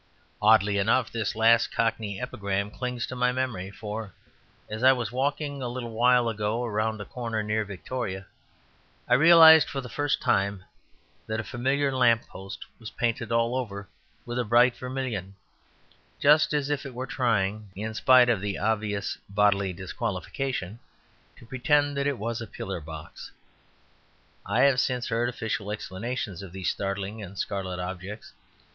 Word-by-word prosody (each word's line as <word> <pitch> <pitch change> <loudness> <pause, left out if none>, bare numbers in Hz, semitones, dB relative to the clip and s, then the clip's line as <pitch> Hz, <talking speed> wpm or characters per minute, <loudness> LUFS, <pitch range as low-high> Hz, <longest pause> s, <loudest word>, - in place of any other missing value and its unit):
Oddly 105 -1 +4
enough, 110 +4 +2
this 115 -3 -2
last 115 +1 +4
Cockney 110 -3 -1
epigram 100 0 -3
clings 125 0 -3
to 130 - -7
my 125 0 +2
memory. 125 -8 -3
For 105 0 -6 0.5
as 110 +1 -6
I 130 +1 +8
was 120 -4 -3
walking 140 +2 -2
a 125 - -2
little 120 -1 -5
while 120 +1 +3
ago 110 +2 -1
round 110 0 -1
a 105 - -6
corner 115 -3 -3
near 105 +1 0
Victoria 100 0 -5 0.8
I - - +3
realized 160 +2 +8
for 140 - -4
the 125 -2 -7
first 145 -1 0
time 100 -1 0 0.6
that 110 0 -2
a - - -2
familiar 135 +4 0
lamp 120 -3 +3
post 95 +1 -9
was 110 -2 -8
painted 115 -1 -2
all 115 +1 +1
over 100 -6 -4 0.4
with 120 +1 -3
a - - +1
bright 120 +2 +4
vermilion 125 -7 -4 0.8
just 150 +1 +5
as 145 -1 0
if 145 -1 -1
it 135 -4 -8
were 130 +1 -3
trying 110 -5 0
(in 110 +3 -4
spite 125 +3 +6
of 115 -5 +1
the 100 -1 -2
obvious 105 -2 -1
bodily 100 -1 +2
disqualification) 95 +4 -4 0.6
to - - -15
pretend 145 +4 +1
that 140 0 0
it 140 -3 -1
was 115 +2 -3
a 115 - -6
pillar 95 -2 -5
box. 80 0 -9 1.2
I 105 +6 +2
have 135 -2 +5
since 125 -1 -1
heard 120 +1 0
official 110 -3 -3
explanations 105 -1 -4
of 95 -3 -10
these 95 -3 -2
startling 100 +2 -4
and 100 0 -9
scarlet 95 -1 -3
objects. 95 +4 -7
115 Hz, 160 wpm, -27 LUFS, 100-125 Hz, 1.2 s, I